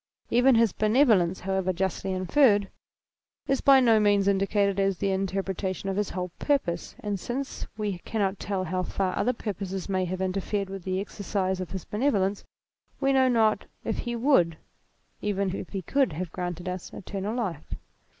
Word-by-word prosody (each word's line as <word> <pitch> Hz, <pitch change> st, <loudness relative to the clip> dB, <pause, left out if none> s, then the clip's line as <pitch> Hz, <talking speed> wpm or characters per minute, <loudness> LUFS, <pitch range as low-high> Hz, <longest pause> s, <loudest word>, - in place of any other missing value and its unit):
Even 245 Hz, +2 st, +5 dB
his 225 Hz, -4 st, +4 dB
benevolence, 215 Hz, -6 st, +3 dB
however 190 Hz, 0 st, 0 dB
justly 190 Hz, +1 st, -2 dB
inferred, 200 Hz, +2 st, +3 dB, 0.8 s
is 270 Hz, 0 st, +1 dB
by 275 Hz, -1 st, +7 dB
no 230 Hz, -4 st, +5 dB
means 205 Hz, -1 st, +3 dB
indicated 200 Hz, 0 st, +2 dB
as 195 Hz, -1 st, +1 dB
the 195 Hz, +1 st, 0 dB
interpretation 190 Hz, 0 st, -2 dB
of 190 Hz, -, -1 dB
his 205 Hz, 0 st, 0 dB
whole 180 Hz, -1 st, -3 dB
purpose, 220 Hz, -, -1 dB
and 205 Hz, -2 st, -2 dB
since 260 Hz, +7 st, -4 dB
we 205 Hz, -4 st, -2 dB
cannot 195 Hz, -1 st, -2 dB
tell 195 Hz, -2 st, -2 dB
how 185 Hz, +1 st, -1 dB
far 185 Hz, 0 st, -1 dB
other 250 Hz, -, +2 dB
purposes 195 Hz, -5 st, -4 dB
may 185 Hz, -2 st, 0 dB
have 185 Hz, +1 st, -4 dB
interfered 195 Hz, +1 st, -2 dB
with 195 Hz, -2 st, -7 dB
the 185 Hz, 0 st, -1 dB
exercise 195 Hz, -2 st, -2 dB
of 180 Hz, -, -5 dB
his 190 Hz, -1 st, -6 dB
bene 245 Hz, +7 st, +1 dB
volence, 200 Hz, -4 st, 0 dB, 0.6 s
we 275 Hz, 0 st, +2 dB
know 260 Hz, -1 st, +5 dB
not 225 Hz, -3 st, +2 dB, 0.2 s
that -, -, -2 dB
he 240 Hz, -1 st, -3 dB
'would, 225 Hz, -, +3 dB, 0.6 s
even 200 Hz, -2 st, -1 dB
if -, -, -6 dB
he 195 Hz, -2 st, -4 dB
could 270 Hz, -, +1 dB
have 170 Hz, +2 st, -4 dB
granted 175 Hz, 0 st, -4 dB
us 180 Hz, 0 st, -5 dB
eternal 200 Hz, +3 st, -4 dB
life. 185 Hz, -11 st, -3 dB
195 Hz, 170 wpm, -27 LUFS, 185-220 Hz, 0.8 s, by